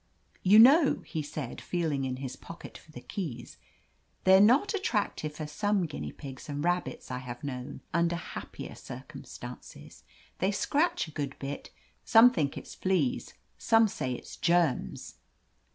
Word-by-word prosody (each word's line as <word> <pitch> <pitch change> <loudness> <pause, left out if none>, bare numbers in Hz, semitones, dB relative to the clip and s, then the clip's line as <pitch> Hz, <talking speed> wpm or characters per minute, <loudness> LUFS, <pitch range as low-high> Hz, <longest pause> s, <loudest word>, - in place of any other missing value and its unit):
"You 195 +3 +6
know," 275 +7 +7
he 160 - -3
said, 145 -3 -6
feeling 155 -6 -1
in 130 -1 -2
his 130 -1 -6
pocket 165 - -11
for 155 - -14
the - - -9
keys, 165 - -6 0.7
"they're 190 +1 +7
not 255 - +5
attractive 205 - -1
as 150 -1 -5
some 205 +1 +1
guinea 150 - -5
pigs 135 -1 -10
and 145 0 -3
rabbits 175 -8 -1
I 125 - -3
have 125 -1 -8
known 130 -1 -5
under 170 +1 +2
happier 170 - -7
circumstances. - - -10 0.4
They 190 - +2
scratch 310 - +1
a - - -10
good 145 -3 -4
bit 140 +1 -6 0.2
— - - -40
some 240 +1 +7
think 150 - -1
it's - - -8
fleas; 190 +7 0 0.2
some 225 -1 +5
say 130 -10 -3
it's - - -9
germs.' 170 -6 0
170 Hz, 150 wpm, -29 LUFS, 140-210 Hz, 0.7 s, know